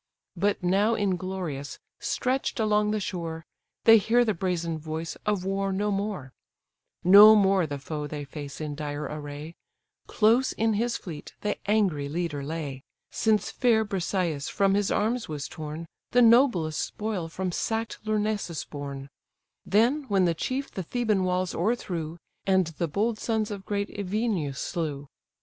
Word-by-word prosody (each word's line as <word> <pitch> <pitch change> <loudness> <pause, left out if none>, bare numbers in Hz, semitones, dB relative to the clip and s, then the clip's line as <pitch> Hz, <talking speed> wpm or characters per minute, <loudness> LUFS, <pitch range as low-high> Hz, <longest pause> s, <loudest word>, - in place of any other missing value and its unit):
But 200 +2 0
now 200 +5 +3
inglorious, 185 -8 -3 0.2
stretch'd 255 0 -1
along 210 -1 +2
the 215 0 0
shore, 165 -4 -4 0.4
They 225 -1 +8
hear 240 +4 +3
the 215 - +1
brazen 170 -3 -2
voice 160 +1 -5
of 205 -3 0
war 195 0 0
no 205 +2 0
more; 195 -10 -3 0.7
No 205 +4 +10
more 195 -4 +3
the 145 -1 -4
foe 150 +1 -5
they 145 0 -5
face 140 0 -8
in 150 -2 -4
dire 145 0 -4
array: 150 +2 -6 0.5
Close 235 +4 +3
in 225 0 +1
his 230 +3 0
fleet 155 -5 -9
the 210 - -2
angry 185 -10 +2
leader 155 -3 -2
lay; 140 -3 -5 0.3
Since 215 -2 +1
fair 225 -3 +3
Briseïs 180 -6 -1
from 195 -1 +2
his 205 0 +1
arms 225 +1 0
was 150 -2 -4
torn, 155 +1 -6 0.3
The 245 0 +6
noblest 225 - +4
spoil 210 -6 -3
from 185 +2 -3
sack'd 225 +5 -2
Lyrnessus 210 -5 -1
borne, 140 -2 -6 0.6
Then, 245 +9 +3
when 195 -4 +3
the 170 - +2
chief 260 - -3
the 190 - -4
Theban 210 0 0
walls 180 0 0
o'erthrew, 170 -5 -2 0.3
And 190 -1 +4
the 165 +1 -3
bold 215 +7 -1
sons 220 -2 -1
of 200 -1 -7
great 205 0 -1
Evenus 200 - -2
slew. 145 -4 -3
190 Hz, 150 wpm, -27 LUFS, 155-215 Hz, 0.7 s, No